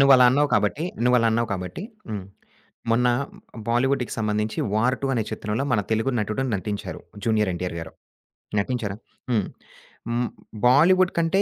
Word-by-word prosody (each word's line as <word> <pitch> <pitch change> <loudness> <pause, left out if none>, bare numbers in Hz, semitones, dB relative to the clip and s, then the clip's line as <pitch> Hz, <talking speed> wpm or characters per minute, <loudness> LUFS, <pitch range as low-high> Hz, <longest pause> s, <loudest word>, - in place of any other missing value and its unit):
నువ్వలా 135 -2 +7
అన్నావు 145 +2 +3
కాబట్టి, 105 +10 +1 0.2
నువ్వలా 125 -2 +4
అన్నావు 115 0 +1
కాబట్టి, 90 - -4 0.3
హ్మ్. 100 -3 -4 0.7
మొన్న 125 +2 +3 0.6
బాలీవుడ్‌కి 125 +1 +1
సంబంధించి 105 0 -1
'వార్ 120 +4 +3
2' 135 -1 0
అనే 115 - +1
చిత్రంలో 110 +3 -2
మన 105 - +3
తెలుగు 110 +4 +1
నటుడు 110 +5 -1
నటించారు 100 +1 -4 0.2
'జూనియర్ 110 -3 +2
ఎన్‌టి‌ఆర్' 90 0 -4
గారు. 80 - -8 0.7
నటించారా? 105 -2 -2 0.3
హ్మ్. 105 -5 +2 0.6
హ్మ్. 120 0 0 0.4
బాలీవుడ్ 180 +8 +5
కంటే 170 +4 +3
115 Hz, 135 wpm, -24 LUFS, 105-135 Hz, 0.7 s, నువ్వలా